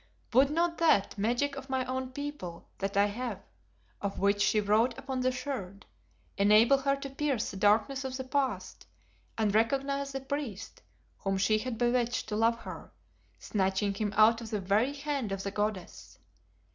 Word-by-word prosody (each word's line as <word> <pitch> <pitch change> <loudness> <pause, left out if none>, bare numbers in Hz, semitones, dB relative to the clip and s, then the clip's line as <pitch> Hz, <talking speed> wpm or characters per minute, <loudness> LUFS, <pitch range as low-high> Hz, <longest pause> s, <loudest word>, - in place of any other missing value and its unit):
Would 265 +3 +5
not 335 +2 0
that 315 -12 +3
"magic 240 +7 0
of 270 0 -8
my 260 -1 0
own 260 0 -3
people 285 - -6
that 200 +1 -2
I 200 - +6
have" 215 0 -4 0.6
of 200 -1 -3
which 200 +1 +2
she 215 - +3
wrote 220 +4 +2
upon 265 -1 -4
the 255 0 +2
Sherd, 250 -7 -5 0.5
enable 215 +7 +6
her 275 0 +1
to 275 0 -7
pierce 275 -4 -1
the 190 - -7
darkness 215 +7 +2
of 260 -1 -4
the 260 - -4
Past 265 0 -2 0.5
and 215 -3 +1
recognize 275 +5 +1
the 270 0 -4
priest 265 -7 -5 0.4
whom 195 0 -1
she 215 +3 +2
had 245 0 -4
bewitched 240 0 +1
to 210 - -2
love 230 +1 +2
her, - - -9 0.5
snatching 195 0 0
him 205 +1 -2
out 225 +2 +6
of 225 - -7
the 210 - -2
very 205 +8 +1
hand 280 -6 -3
of 195 0 -3
the 200 - -3
goddess? 205 -2 -4
235 Hz, 170 wpm, -30 LUFS, 205-270 Hz, 0.6 s, I